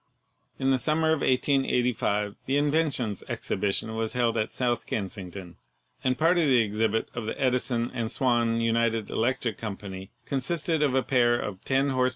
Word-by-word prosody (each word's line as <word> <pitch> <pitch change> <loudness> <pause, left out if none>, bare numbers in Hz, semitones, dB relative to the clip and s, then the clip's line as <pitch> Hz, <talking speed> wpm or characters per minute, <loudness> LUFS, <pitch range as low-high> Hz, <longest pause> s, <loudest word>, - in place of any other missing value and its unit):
In 135 0 +1
the 130 - +3
summer 160 +3 +1
of 160 - +2
1885 125 -6 +1
tne 135 +2 +2
Inventions 145 - +1
Exhibi 100 +1 -1
tion 110 +3 +1
was 110 0 -2
held 120 -2 +1
at 110 -1 0
South 120 -2 -1
Kensington, 95 -3 -5 0.5
and 130 0 +1
part 170 +3 +3
of 165 - +3
the 130 -2 +5
exhibit 110 +1 0
of 115 -2 -5
the - - -4
Edison 125 -2 0
and 115 -3 -2
Swan 120 -3 +1
United 115 -1 +1
Electric 115 -2 -1
Company 100 -3 -6 0.2
con 135 - -1
sisted 160 +3 0
of 135 -3 +1
a 130 - +2
pair 120 -2 +3
of 95 -3 -5
10 135 +1 +2
hp. 130 -1 +2
120 Hz, 175 wpm, -27 LUFS, 110-135 Hz, 0.5 s, the